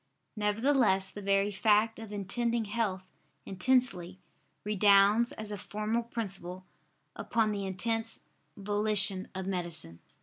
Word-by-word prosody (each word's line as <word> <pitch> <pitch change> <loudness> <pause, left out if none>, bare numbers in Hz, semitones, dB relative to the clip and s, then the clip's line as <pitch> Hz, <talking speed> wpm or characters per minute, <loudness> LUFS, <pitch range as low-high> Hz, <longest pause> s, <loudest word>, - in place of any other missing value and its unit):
Nevertheless 210 -2 +2
the 205 - -8
very 195 +1 +2
fact 215 +2 +2
of 225 -2 -9
intending 230 +3 -1
health 205 -3 -2 0.4
intensely, 190 -4 0 0.4
redounds, 205 +2 +4
as 215 -1 -6
a 205 - -5
formal 215 +4 -2
principle, 195 -6 -5 0.5
upon 220 -1 0
the 200 -2 -3
intense 225 +4 -2 0.3
volition 205 -1 +1
of 190 0 -4
medicine. 170 - -3
205 Hz, 110 wpm, -30 LUFS, 190-225 Hz, 0.5 s, redounds